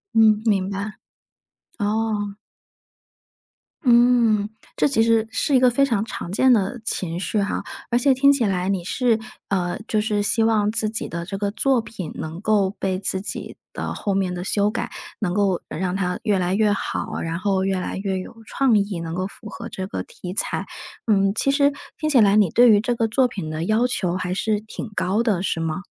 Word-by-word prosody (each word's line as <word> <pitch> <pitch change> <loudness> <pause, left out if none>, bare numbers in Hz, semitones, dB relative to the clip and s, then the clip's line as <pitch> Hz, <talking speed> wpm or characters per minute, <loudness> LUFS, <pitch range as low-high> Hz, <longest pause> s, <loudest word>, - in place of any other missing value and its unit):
嗯， 215 -1 +5
明 195 -4 +2
白。 200 +2 -5 0.8
哦。 210 -1 -1 1.5
嗯， 235 -4 +4 0.3
这 - - +3
其 245 -6 +2
实 225 -1 +3
是 275 +3 +1
一 - - +6
个 250 0 +5
非 275 +3 +3
常 225 -7 0
常 180 -5 -6
见 260 +6 +4
的 220 +1 +2
情 175 -5 -2
绪 205 +2 -1
哈， 200 - -2 0.3
而 240 - +3
且 270 +2 +4
听 280 +2 +5
起 265 -5 +1
来 185 -2 0
你 190 -3 -1
是 230 +4 +1 0.3
呃， 180 -3 -1
就 215 - +1
是 210 -1 0
希 225 +2 +3
望 215 -2 +2
自 220 -1 0
己 220 - -3
的 170 +1 -5
这 195 +2 -5
个 200 0 -1
作 260 +3 +2
品 210 -7 -7
能 160 +3 -6
够 205 -3 +2
被 190 -1 -1
自 190 0 -1
己 200 - -6 0.2
的 - - -4
后 200 -2 -2
面 190 -2 0
的 180 0 -4
修 205 +2 +1
改， - - -3 0.3
能 180 -5 -1
够 195 -3 +1
让 180 +2 -3
它 180 -2 -1
越 210 -4 +2
来 180 +1 0
越 210 0 +3
好， 200 - -3
然 165 0 -3
后 190 0 0
越 190 -1 0
来 - - -4
越 195 -1 -2
有 185 - -9
创 265 -4 +2
意， 200 -3 -1
能 165 -1 -5
够 185 +2 -2
符 215 +2 -11
合 - - -8
这 190 - -5
个 - - -4
题 180 0 -8
材。 205 - -1 0.4
嗯， 195 -3 +3
其 275 - +2
实 280 0 +3 0.3
听 310 - 0
起 275 -5 +5
来 205 -2 +5
你 210 -4 +4
对 240 +8 +6
于 205 - +6
这 240 +2 -1
个 225 -1 +1
作 250 +4 +3
品 190 -9 -6
的 155 +1 -3
要 220 +5 +2
求 185 -8 -1
还 180 -1 -2
是 210 +2 0
挺 220 +1 -7
高 195 +5 +1
的， 205 -6 0
是 170 - -1
吗？ 165 +2 -2
205 Hz, 220 characters per minute, -22 LUFS, 190-225 Hz, 1.5 s, 一